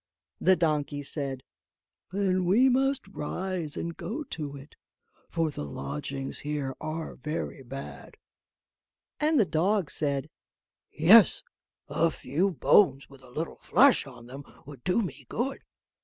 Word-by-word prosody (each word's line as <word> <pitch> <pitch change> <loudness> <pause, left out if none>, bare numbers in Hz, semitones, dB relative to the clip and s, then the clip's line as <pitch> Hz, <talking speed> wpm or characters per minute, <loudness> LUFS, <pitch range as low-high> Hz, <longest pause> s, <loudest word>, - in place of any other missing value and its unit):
The 190 - +5
donkey 150 -4 0
said: 135 -3 -3 0.7
"Then 185 -2 +1
we 230 +9 +5
must 265 -1 +1
rise 180 -2 -4
and 170 0 -4
go 280 +8 -4
to 150 - -6
it, 140 +1 -13 0.6
for 165 -2 0
the 105 - -5
lodgings 135 - -4
here 145 -3 -3
are 160 +1 -4
very 150 0 -4
bad;" 135 +2 -9 1.0
and 305 -1 +3
the 215 - +5
dog 180 +2 +1
said, 140 -3 -1 0.6
"Yes; - - +6 0.4
a 165 - +2
few 160 +6 -1
bones 140 -3 +3
with 135 -1 -15
a 130 - -16
little 155 +6 -4
flesh 270 - +4
on 120 -3 -12
them 135 +3 -9 0.2
would 140 -4 -12
do 185 +5 +2
me 140 - -7
good." 265 +4 -2
155 Hz, 135 wpm, -28 LUFS, 140-190 Hz, 1.0 s, Yes